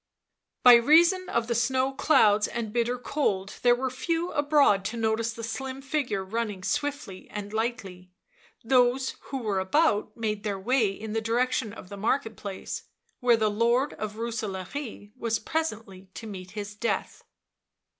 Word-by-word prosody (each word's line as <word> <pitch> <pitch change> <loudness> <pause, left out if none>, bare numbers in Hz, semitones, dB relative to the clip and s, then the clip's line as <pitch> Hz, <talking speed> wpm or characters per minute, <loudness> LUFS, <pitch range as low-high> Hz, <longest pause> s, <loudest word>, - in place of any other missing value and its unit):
By 245 - +10
reason 340 +9 +4
of 235 -1 0
the 235 - -1
snow 260 +3 +1
clouds 215 -7 +4
and 225 -3 -4
bitter 240 +1 0
cold 210 -7 -2
there 245 -1 +5
were 260 +1 -2
few 335 +6 -2
abroad 290 -9 +3
to 230 +4 -3
notice 225 0 0
the 230 0 -8
slim 260 +4 -4
figure 265 -8 -2
running 210 -2 -3
swiftly 290 -8 -3
and 205 0 -6
lightly 210 -6 -3 0.5
those 255 +2 +2
who 270 - -4
were 200 -3 0
about 210 0 +1
made 215 -2 -2
their 205 -3 -2
way 235 +1 +2
in 210 +2 -6
the 225 - 0
direction 240 +1 0
of 195 -4 -11
the 200 - -8
market 225 +2 0
place, 195 -1 -6 0.3
where 240 -2 +4
the 215 -1 +1
Lord 235 +6 +2
of 215 -1 -5
Rooselaare 220 0 -5
was 230 -3 -1
nnp - - -15
S 320 0 +3
fi - - -6
ntl 195 -4 -15
d 230 - -7 0.2
t0 205 +1 -7
death. 235 - -2
230 Hz, 165 wpm, -27 LUFS, 210-260 Hz, 0.5 s, By